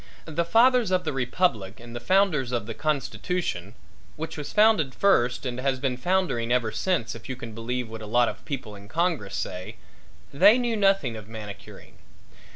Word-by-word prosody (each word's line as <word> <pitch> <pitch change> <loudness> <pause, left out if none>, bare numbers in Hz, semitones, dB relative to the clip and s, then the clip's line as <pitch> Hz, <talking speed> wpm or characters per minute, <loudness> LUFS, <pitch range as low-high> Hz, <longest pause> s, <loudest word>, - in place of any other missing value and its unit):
The 165 +1 -1
fathers 235 +4 +4
of 185 -1 +1
the 155 - -2
republic 120 - 0
and 120 0 -11
the - - -3
founders 165 -5 +2
of 120 -4 -1
the 115 - -5
constitution, 145 - -2 0.4
which 160 +1 -5
was 150 -2 -6
founded 210 -11 +4
first 125 -11 +2
and 125 -1 -3
has 135 0 0
been 130 -1 -1
foundering 130 -6 0
ever 125 -3 +2
since 165 - -1
if 115 +2 -11
you 130 - -3
can 115 -2 -8
believe 120 +2 -3
what 110 0 -8
a 105 - -7
lot 120 +2 +3
of - - -6
people 130 -8 -5
in 100 0 -13
Congress 160 - -1
say 95 +5 -5 0.6
they 205 - +7
knew 240 -2 0
nothing 195 - +2
of 105 -2 -9
manicuring. 105 -3 -10
130 Hz, 180 wpm, -26 LUFS, 115-180 Hz, 0.6 s, they